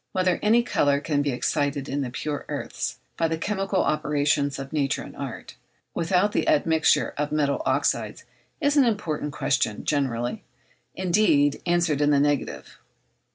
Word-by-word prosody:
Whether 185 -1 +1
any 230 +3 +4
colour 145 -11 +2
can 145 -1 0
be 145 - 0
excited 140 +2 -1
in 140 +1 -2
the 130 - -3
pure 145 +4 -4
earths - - -4 0.2
by 165 - +2
the 160 0 -2
chemical 195 +2 -1
operations 145 -2 +1
of 135 +2 -7
nature 140 -3 0
and - - -11
art, - - -7 0.4
without 180 +4 +1
the - - 0
admixture 165 - +3
of 150 0 -1
metallic 145 -2 +1
oxydes, - - 0 0.4
is 290 -2 +1
an 285 - +6
important 160 -10 -1
question, 130 -7 -1
generally, 125 -5 -1 0.5
indeed, 175 -6 +2
answered 170 -4 +2
in 145 - +3
the 145 -1 +4
negative. 145 -1 -1
150 Hz, 155 wpm, -25 LUFS, 140-180 Hz, 0.5 s, an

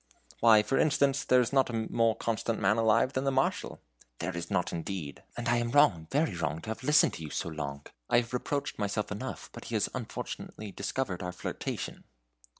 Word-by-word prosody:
"Why, 110 -2 +7
for 135 - +1
instance, 140 -2 +3
there 125 0 +5
is 125 +2 -2
not 135 -2 +4
a - - -5 0.2
more 115 -1 +3
constant 115 0 -1
man 100 +2 +3
alive 115 +3 +3
than 130 - 0
the 135 - +1
Marshal." 135 0 0 0.4
"There 95 - -3
is 85 0 -4
not 95 -4 0
indeed! 85 -3 -5 0.2
and 120 0 -3
I 120 -1 +3
am 120 0 0
wrong, 120 - +4
very 145 -5 +2
wrong 80 -2 -2
to - - -8
have 110 - -5
listened 150 +2 +5
to - - -7
you 75 - -5
so 85 - -3
long. 70 -3 -5 0.2
I 120 0 +4
reproached 140 +2 -2
myself 105 0 -1
enough, 105 - -5
but - - -9
he - - -4
has - - +1
unfortunately 105 -2 -6
discovered 100 0 -3
our 90 -1 -3
flirtation." 90 - -5
110 Hz, 200 wpm, -30 LUFS, 90-130 Hz, 0.4 s, Why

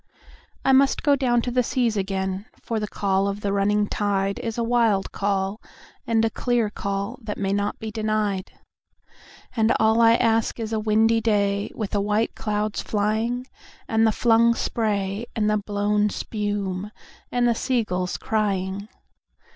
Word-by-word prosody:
I 270 - +5
must 270 +1 +4
down 285 -2 +4
go 245 -3 +2
to 245 - -3
the 250 +1 +3
seas 240 -2 0
again, 190 0 -2
for 225 -2 -3
the 210 - -3
call 195 -1 0
of 200 +1 -3
the 200 -1 -1
running 205 +1 +2
tide 200 -1 -1
Is 225 -1 -4
a 235 - 0
wild 230 -4 +2
call 195 +1 -1 0.5
and 225 -1 +3
a 225 - 0
clear 240 -4 0
call 200 +4 -3
that 215 -2 -5
may 195 -1 -1
not 205 0 -1
be 220 -1 -6
denied; 215 -3 -1 1.0
And 225 -1 +3
all 220 +1 +4
I 230 0 +6
ask 230 -1 +1
is 225 0 -3
a 220 - +1
windy 220 +1 +3
day 200 -2 +1
with 215 -3 -4
the 205 - +1
white 210 +2 0
clouds 210 0 -2
flying, 220 +4 -1 0.4
And 225 0 +3
the - - +4
flung 235 +1 +4
spray 210 -1 -1
and 215 -2 +1
the 215 0 +2
blown 205 0 0
spume, 205 -3 -3 0.4
and 245 -1 +2
the 235 - +3
sea 245 +1 0
gulls 180 -2 -2
crying. 200 -2 -1
215 Hz, 165 wpm, -24 LUFS, 200-230 Hz, 1.0 s, I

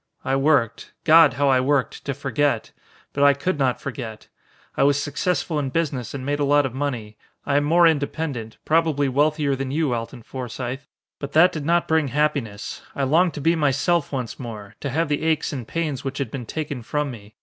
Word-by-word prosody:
I 135 - +1
worked. 135 -5 +1
God, 165 -1 +7
how 140 0 +1
I 130 -1 +4
worked 135 0 0
to 140 - -2
forget! 135 -2 0 0.4
But 140 - +1
I 140 -1 +6
could 165 +3 -2
not 130 -2 +1
forget. 115 -4 -7 0.5
I - - 0
was 140 +1 +4
successful 150 +2 -1
in 140 -2 -2
business 140 -4 -2
and 130 -2 -5
made 145 +1 -1
a - - +1
lot 145 0 +4
of 130 - -4
money. 125 -6 -4 0.3
I 140 0 +2
am 145 - +2
more 170 +3 +5
independent 145 -6 -1
probably 155 -3 +2
wealthier 145 +1 +1
than 135 0 -4
you, 145 -2 0
Alton 115 +1 -5
Forsythe, 125 +1 -5 0.4
but 140 0 -6
that 170 +4 +6
did 150 -2 -5
not 170 0 +2
bring 160 -2 +2
happiness. 135 -7 -2
I 140 - -1
longed 165 +6 +3
to 145 - -5
be 165 +4 +3
myself 150 +2 +1
once 130 -4 -4
more, 110 -5 -8
to 140 - -3
have 160 +5 0
the 145 0 -1
aches 160 -2 0
and 125 -5 -5
pains 155 -5 -2
which 135 0 -4
had 135 -6 -3
been 125 -4 -6
taken 145 -3 -4
from 145 +4 -2
me. 105 -3 -12
140 Hz, 205 wpm, -23 LUFS, 130-150 Hz, 0.5 s, God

